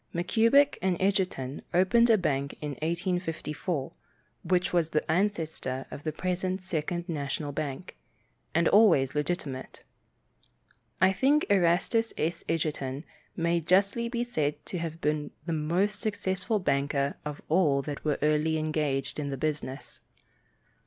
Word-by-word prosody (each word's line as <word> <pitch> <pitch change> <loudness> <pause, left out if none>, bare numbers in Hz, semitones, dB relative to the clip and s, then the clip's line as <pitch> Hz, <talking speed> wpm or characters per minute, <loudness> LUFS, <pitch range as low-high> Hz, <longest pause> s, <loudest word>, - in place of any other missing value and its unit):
Mackubin 230 +11 +4
& - - -33 0.2
Edgerton 185 -9 0
opened 235 +6 +4
a 225 - +6
bank 140 -6 -1
in 150 - -4
1854, 165 -3 -2 0.5
which 180 +1 +1
was 170 -2 +2
the 155 0 0
ancestor 160 -8 -1
of - - -7
the 155 - -2
present 185 +3 -2
Second 175 0 -3
National 145 -2 -3
Bank, 145 +4 -5 0.6
and 170 0 +4
always 165 -11 +5
legitimate. 150 -3 -3 1.2
I 185 +1 +5
think 280 +9 +3
Erastus 195 +5 +2
S. 165 +3 -1
Edgerton 150 -3 -2 0.3
may 170 0 +1
justly 200 +7 +2
be 240 -1 -1
said 150 -11 -1
to 180 - -4
have 165 0 -5
been 150 -1 0 0.2
the 170 - -2
most 175 +7 0
successful 205 -1 -1
banker 140 -4 0
of 150 -1 -5
all 150 -5 +3
that 145 -1 -6
were 150 -2 +1
early 155 +1 +2
engaged 150 -3 -1
in 145 -1 -2
the 135 - -3
business. 145 -2 -4
165 Hz, 130 wpm, -28 LUFS, 150-185 Hz, 1.2 s, a